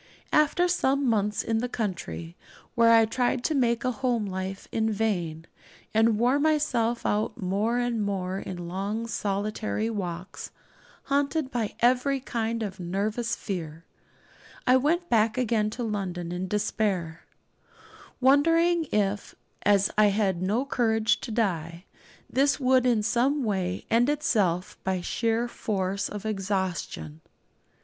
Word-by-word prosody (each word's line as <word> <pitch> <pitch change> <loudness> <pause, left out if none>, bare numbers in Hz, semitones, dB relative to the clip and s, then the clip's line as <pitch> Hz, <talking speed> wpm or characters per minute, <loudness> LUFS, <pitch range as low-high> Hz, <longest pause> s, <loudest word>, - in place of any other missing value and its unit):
After 305 +4 +4
some 280 -6 +1
months 210 -2 +1
in 225 -1 0
the 245 +2 -2
country, 85 - -4 0.4
where 230 0 +5
I 225 -1 +7
tried 245 +2 0
to 315 - +1
make 240 -3 +1
a 255 - +2
home 245 -3 -1
life 190 0 -5
in 220 0 0
vain, 175 -7 -1 0.5
and 220 0 +4
wore 250 +5 +3
myself 265 -7 +1
out 210 +1 0
more 205 +5 0
and 240 -2 0
more 190 -2 -2
in 175 -3 -6
long 200 +5 -3
solitary 215 +1 -2
walks, 180 -3 -5 0.5
haunted 280 0 0
by 225 -4 -2
every 255 +3 +3
kind 230 -2 -2
of 195 -3 -5
nervous 205 +6 -1
fear, 165 -4 -6 0.8
I 255 - +5
went 325 +7 +1
back 225 -3 +2
again 225 -4 +1
to 240 +3 -5
London 185 -6 -3
in 180 +1 -3
despair, 195 -5 -1 1.0
wondering 330 +6 +4
if, 205 -1 -1 0.3
as 200 -1 +3
I 215 - +7
had 195 -3 +1
no 215 +8 0
courage 225 -5 +1
to 240 - -6
die, 175 -6 -2 0.4
this 280 +2 +2
would 255 -1 +3
not - - +4
in 215 -3 +1
some 260 +6 +1
way 190 -4 -2
end 235 +4 +4
itself 205 - 0
by 190 -1 -1
sheer 230 +5 0
force 200 -4 -2
of 210 0 -7
exhaustion. 190 - -3
220 Hz, 140 wpm, -27 LUFS, 190-245 Hz, 1.0 s, I